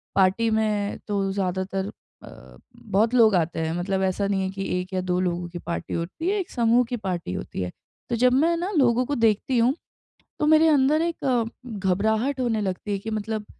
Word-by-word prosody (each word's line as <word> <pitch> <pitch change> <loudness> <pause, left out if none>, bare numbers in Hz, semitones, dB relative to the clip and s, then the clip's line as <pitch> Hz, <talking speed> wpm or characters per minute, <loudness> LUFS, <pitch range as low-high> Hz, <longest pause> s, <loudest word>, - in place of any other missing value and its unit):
Party 195 +4 +3
में 215 -2 0
तो 195 -2 0
ज़्यादातर 190 0 -2 0.4
अ, 65 -1 -14 0.2
बहुत 220 +3 +1
लोग 225 -5 +5
आते 165 -1 0
हैं। 160 0 -1
मतलब 190 +1 -1
ऐसा 190 +1 0
नहीं 195 -1 0
है 190 - -1
कि 195 0 -5 0.2
1 185 +1 -10
या 185 - 0
2 180 0 -1
लोगों 175 -1 -1
की 175 0 -7
पार्टी 170 +1 -4
होती 185 - -3
है 410 +1 +1
एक 375 - -4
समूह 235 0 +3
की 245 - -2
पार्टी 180 - -4
होती 95 - -5
है। 90 -1 -3 0.4
तो 240 - 0
जब 250 +2 +3
मैं 320 +6 +3
न 350 +3 -2
लोगों 250 -2 +3
को 285 - -2
देखती 230 +2 +2
हूँ 235 +3 +4 0.7
तो - - +1
मेरे 315 +1 +6
अंदर 295 0 +4
एक 260 -9 0 0.3
घबराहट 220 +8 0
होने 235 -4 0
लगती 195 +1 -3
है 200 - 0
कि 220 - -6
मतलब 215 0 -3
210 Hz, 205 wpm, -24 LUFS, 190-245 Hz, 0.7 s, मेरे